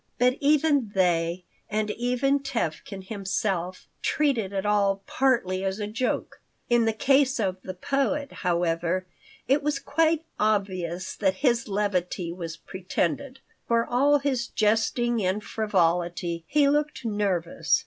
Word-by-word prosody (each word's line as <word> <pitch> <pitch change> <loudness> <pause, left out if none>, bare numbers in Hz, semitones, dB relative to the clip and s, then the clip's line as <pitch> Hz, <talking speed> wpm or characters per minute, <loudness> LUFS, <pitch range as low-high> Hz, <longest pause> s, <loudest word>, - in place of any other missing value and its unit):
But 250 +2 +3
even 285 -6 +2
they, 175 -1 +1 0.3
and 215 0 -1
even 250 +5 +1
Tevkin 200 - -4
himself, 195 -3 -2 0.2
treated 260 -10 +1
it 195 0 -2
all 200 -1 +2
partly 210 -9 +1
as 195 +2 -2
a 210 - -2
joke. 225 +5 -2 0.3
In 240 -1 +4
the 225 - +3
case 270 +3 +2
of 190 -4 0
the 185 - -7
poet, 275 +6 -1
however, 175 0 0 0.4
it 275 +3 +3
was 290 -1 0
quite 320 +3 +1 0.2
obvious 185 -4 -1
that 190 -2 +1
his 235 -2 +2
levity 185 -4 -1
was 165 -2 -6
pretended. 190 - -3 0.3
For 230 0 +2
all 280 +4 +3
his 265 -4 -1
jesting 225 +1 +1
and 190 +3 0
frivolity, 175 -5 0
he 290 -1 +3
looked 295 -2 0
nervous. 200 -6 +1
210 Hz, 130 wpm, -26 LUFS, 185-265 Hz, 0.4 s, In